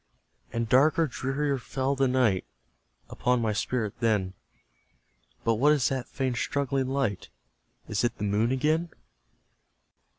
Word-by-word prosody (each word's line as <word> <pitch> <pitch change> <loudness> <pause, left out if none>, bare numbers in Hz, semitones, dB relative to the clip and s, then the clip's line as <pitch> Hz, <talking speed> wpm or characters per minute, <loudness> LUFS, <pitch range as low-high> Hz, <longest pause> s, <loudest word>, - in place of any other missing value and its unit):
And 115 0 -2
darker, 150 +7 +4
drearier 135 +1 -2
fell 135 +2 -2
the 135 0 +2
night 125 -7 +2 0.7
Upon 125 0 +1
my 110 -2 0
spirit 110 -1 -2
then; 105 -5 +1 1.1
But 115 -1 +2
what 145 +6 +5
is 140 -5 +2
that 130 -2 -3
faint 130 -3 -2
struggling 135 -1 -1
light? 130 -8 -1 0.6
Is 105 +1 -1
it 120 - 0
the - - -5
Moon 105 +4 +1
again? 155 +6 +1
130 Hz, 130 wpm, -27 LUFS, 115-140 Hz, 1.1 s, what